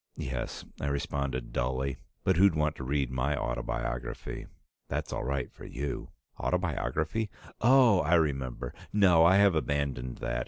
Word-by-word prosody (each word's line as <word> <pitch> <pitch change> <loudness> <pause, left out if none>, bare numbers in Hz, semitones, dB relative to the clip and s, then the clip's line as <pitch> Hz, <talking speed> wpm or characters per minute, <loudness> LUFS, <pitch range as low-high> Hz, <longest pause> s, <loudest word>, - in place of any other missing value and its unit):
"Yes," - - -4
I 70 - -2
responded 70 -3 -2
dully. 65 +2 -1 0.3
"But - - +3
who'd 95 -2 +6
want 75 0 +1
to - - -6
read 70 -1 0
my 65 +3 0
autobiography? 60 0 -3 0.4
That's - - -3
all - - -2
right 70 0 -2
for - - -13
you." 70 +2 -4 0.3
"Autobiography? 90 +3 -1 0.3
Oh! 120 -4 +6
I 80 +3 +3
remember. 65 -6 0 0.2
No, 90 -5 +5
I 90 +3 +6
have 100 -1 +6
abandoned 70 -5 -1
that. 65 -2 -2
70 Hz, 145 wpm, -30 LUFS, 65-85 Hz, 0.4 s, who'd